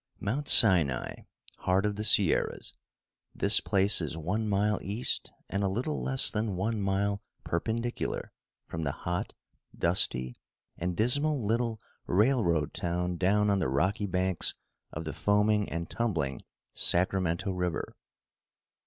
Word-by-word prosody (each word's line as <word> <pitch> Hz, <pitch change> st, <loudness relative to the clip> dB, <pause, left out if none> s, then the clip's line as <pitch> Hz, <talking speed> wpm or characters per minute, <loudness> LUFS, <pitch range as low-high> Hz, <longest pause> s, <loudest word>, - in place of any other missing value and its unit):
Mount 135 Hz, +8 st, -3 dB
Sinai, 85 Hz, -, +5 dB, 0.4 s
Heart 95 Hz, +2 st, +1 dB
of 105 Hz, -1 st, -1 dB
the 105 Hz, -, -4 dB
Sierras 100 Hz, -4 st, +1 dB, 0.6 s
this -, -, +6 dB
place 100 Hz, -1 st, +3 dB
is 80 Hz, 0 st, -4 dB
one 105 Hz, +7 st, -2 dB
mile 105 Hz, +1 st, +1 dB
east 105 Hz, +5 st, -1 dB, 0.2 s
and 100 Hz, +1 st, -2 dB
a -, -, +2 dB
little 125 Hz, +10 st, -3 dB
less 130 Hz, -1 st, +3 dB
than 105 Hz, -3 st, -2 dB
one 105 Hz, +4 st, -2 dB
mile 100 Hz, +1 st, -1 dB, 0.2 s
perpendicular 115 Hz, +7 st, -3 dB, 0.3 s
from 80 Hz, -, -6 dB
the 70 Hz, -3 st, -2 dB
hot, 90 Hz, +1 st, -4 dB, 0.4 s
dusty 65 Hz, -8 st, +2 dB, 0.4 s
and 90 Hz, 0 st, -4 dB
dismal 140 Hz, +3 st, +3 dB
little 115 Hz, 0 st, -1 dB, 0.3 s
railroad 95 Hz, -, +1 dB
town 90 Hz, 0 st, -2 dB
down 105 Hz, +3 st, +2 dB
on 100 Hz, -, +1 dB
the 90 Hz, -, 0 dB
rocky 95 Hz, -, 0 dB
banks 95 Hz, -1 st, -1 dB, 0.4 s
of 80 Hz, +2 st, -6 dB
the 80 Hz, -, -4 dB
foaming 105 Hz, 0 st, +1 dB
and 85 Hz, 0 st, -4 dB
tumbling 85 Hz, -, -2 dB, 0.3 s
Sacramento 90 Hz, +1 st, +1 dB
River. 90 Hz, -2 st, -3 dB
100 Hz, 130 wpm, -29 LUFS, 85-110 Hz, 0.6 s, this